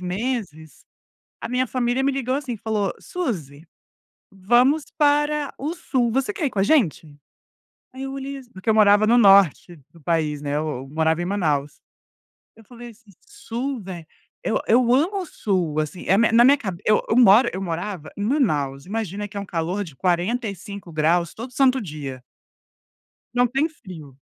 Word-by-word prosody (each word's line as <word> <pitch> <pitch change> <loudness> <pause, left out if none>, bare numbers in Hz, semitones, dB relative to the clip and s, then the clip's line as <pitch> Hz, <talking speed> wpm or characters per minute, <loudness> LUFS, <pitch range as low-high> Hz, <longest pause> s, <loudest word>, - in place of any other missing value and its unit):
meses, 185 - -4 0.6
a - - -5
minha 250 +1 0
família 250 +1 -1
me 275 - +2
ligou, 260 -1 -2
assim, 275 -3 -3
e - - -7
falou: 210 -2 -2
"Susi, 165 - -5 0.7
vamos 245 +10 +2
para 295 0 +2
o 300 +5 -3
Sul, 255 -8 -1
você 270 - 0
quer 355 -8 -2
ir - - -1
com 200 - -2
a - - +3
gente?". 185 - +1 0.8
Aí 260 - -7
eu 270 0 -5
olhei 275 +1 -6
assim 260 -3 -13
porque 190 +3 -9
eu 220 - +4
morava 210 0 +5
no 235 +2 +4
Norte 195 - +5
do 165 - -19
país, 155 -2 -1
né, 145 -1 -3
eu 155 +1 -1 0.2
eu 135 - -11
morava 160 +3 0
em - - -2
Manaus. 155 -7 -1 0.8
Eu 225 - -17
falei 240 +2 -11
assim: 225 -2 -19 0.2
"Sul, 275 - -5
vé 180 -4 -8 0.4
eu - - +1
eu 240 +1 +4
amo 350 +9 +1
o - - -6
Sul", 180 - -2
assim, 155 +3 -4
é 195 - +4
mi 230 +1 +3
na 230 +1 +6
minha 280 +3 +6
cabe 190 -9 -6
eu 215 - +3
eu - - +2
moro 235 0 +6
eu 190 - -4
morava 175 -1 -4
em 205 - -3
Manaus, 150 - 0
imagina 205 0 -4
que 205 - -17
é - - -1
um 200 - -6
calor 180 +3 -2
de 165 -7 -11
45 200 - -2
graus 165 +2 +1
todo 240 +3 -8
santo 260 -1 +2
dia. 145 -7 -7 1.1
Não 245 0 +3
tem 270 +6 0
frio. 170 - -12
210 Hz, 185 wpm, -22 LUFS, 170-255 Hz, 1.1 s, na